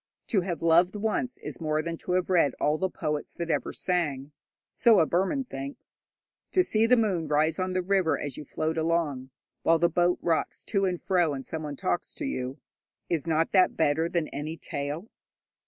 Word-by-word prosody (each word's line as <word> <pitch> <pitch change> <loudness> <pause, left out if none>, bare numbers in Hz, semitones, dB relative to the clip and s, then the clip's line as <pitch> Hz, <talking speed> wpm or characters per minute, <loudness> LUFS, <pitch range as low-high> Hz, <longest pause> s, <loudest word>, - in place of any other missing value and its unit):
To 200 -6 +3
have 175 -2 -4
loved 170 +4 +4
once 220 +4 -1
is - - -7
more 155 -1 0
than 170 +1 -3
to 180 - -3
have 180 0 +1
read 175 -6 +3
all 150 +1 +1
the 190 - 0
poets 150 -3 -3
that 170 -1 -3
ever - - -1
sang. 150 -6 -1 0.4
So 230 -4 +5
a 160 - +5
Burman 190 - 0
thinks. 140 - -8 0.5
To 370 - +5
see 225 -7 +2
the 250 +1 +5
moon 190 -8 +1
rise 155 +4 +2
on 185 0 -1
the 185 0 0
river 185 -3 +2
as 145 -3 -4
you - - -7
float 160 +3 -2
along, 160 -5 0 0.3
while 165 - +4
the 170 +1 +3
boat 175 +1 +2
rocks 165 -2 0
to 195 -2 0
and 180 -2 -1
fro 175 -5 +1
and 135 - -6
someone 155 -2 -5
talks 180 +2 -2
to 305 - -4
you 130 - -3 0.5
is 170 -2 -1
not 160 0 +1
that 185 -2 +4
better 160 +2 +2
than 170 -3 0
any 155 +3 -5
tale? 145 +7 -4
170 Hz, 195 wpm, -27 LUFS, 155-185 Hz, 0.5 s, So